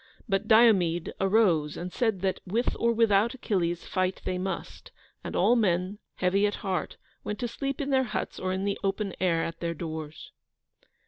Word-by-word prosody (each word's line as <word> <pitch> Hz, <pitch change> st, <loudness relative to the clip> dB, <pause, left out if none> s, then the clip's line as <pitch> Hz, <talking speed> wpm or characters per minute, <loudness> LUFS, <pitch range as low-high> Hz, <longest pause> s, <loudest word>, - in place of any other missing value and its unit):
But 195 Hz, 0 st, 0 dB
Diomede 195 Hz, -7 st, +4 dB
arose 190 Hz, -7 st, +2 dB
and 180 Hz, +1 st, -6 dB
said 220 Hz, -7 st, 0 dB
that, 190 Hz, -1 st, 0 dB
with 230 Hz, +7 st, 0 dB
or 235 Hz, -, +3 dB
without 225 Hz, +1 st, +3 dB
Achilles, 175 Hz, -8 st, -1 dB
fight 185 Hz, 0 st, -1 dB
they 180 Hz, -1 st, -1 dB
must; 190 Hz, +1 st, -5 dB, 0.3 s
and -, -, -5 dB
all 240 Hz, -, +4 dB
men, 190 Hz, -2 st, +1 dB, 0.2 s
heavy 195 Hz, +3 st, +2 dB
at 205 Hz, -, -2 dB
heart, 190 Hz, -2 st, -2 dB, 0.3 s
went 210 Hz, -, -4 dB
to 240 Hz, -, -2 dB
sleep 275 Hz, +3 st, -4 dB
in 285 Hz, -1 st, -2 dB
their 265 Hz, -1 st, +3 dB
huts 220 Hz, -, -4 dB
or 185 Hz, -, -2 dB
in 190 Hz, +1 st, -2 dB
the 200 Hz, -1 st, -1 dB
open 195 Hz, 0 st, -1 dB
air 170 Hz, -3 st, +2 dB
at 165 Hz, 0 st, -5 dB
their 170 Hz, -1 st, -2 dB
doors. 155 Hz, -1 st, -7 dB
195 Hz, 180 wpm, -28 LUFS, 180-220 Hz, 0.3 s, Diomede